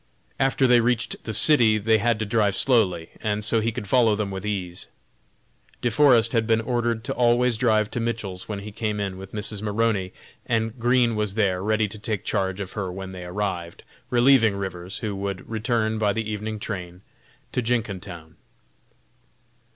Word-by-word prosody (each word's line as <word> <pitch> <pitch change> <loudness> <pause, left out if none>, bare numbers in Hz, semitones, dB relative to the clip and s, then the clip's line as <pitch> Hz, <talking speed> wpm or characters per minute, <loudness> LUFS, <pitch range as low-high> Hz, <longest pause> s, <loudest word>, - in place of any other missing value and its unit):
After 135 0 +2
they 125 -1 +5
reached 115 0 -1
the 110 - -3
city 115 -7 +6
they 110 +1 +2
had 115 +1 +1
to 110 - -2
drive 105 -2 +1
slowly, 95 -10 +2
and 105 0 -1
so 115 +1 +2
he 115 +1 0
could 105 -2 -6
follow 115 -1 +3
them 105 -1 -3
with 95 +2 -5
ease. 90 -4 -4 1.0
De 120 - +1
Forest 120 -3 +5
had 115 -2 +1
been 115 -1 +3
ordered 120 -1 -1
to - - -3
always 120 0 +2
drive 110 -2 +1
to - - -3
Mitchell's 110 -6 -4
when 105 - -3
he 105 +1 -8
came 105 -1 -3
in 100 -2 -3
with 95 0 -10
Mrs. 105 -1 -5
Maroney, 105 -3 0 0.4
and 115 +1 -1
Green 120 -1 +2
was 105 -2 -2
there 95 -4 +1
ready 110 +1 +1
to 105 +1 -10
take 105 -3 -3
charge 95 0 -1
of 95 -2 -5
her 95 -4 -4
when 95 +1 -7
they 90 -1 -8
arrived, 90 -2 -4 0.3
relieving 120 -4 +4
Rivers, 95 -1 -5
who 105 -4 -4
would 100 -1 -5
return 110 -1 -1
by 105 -2 +2
the 115 0 -3
evening 110 0 -4
train 90 -4 -6 0.5
to 125 - -1
Jenkintown. 100 -9 -4
110 Hz, 180 wpm, -24 LUFS, 100-115 Hz, 1.0 s, city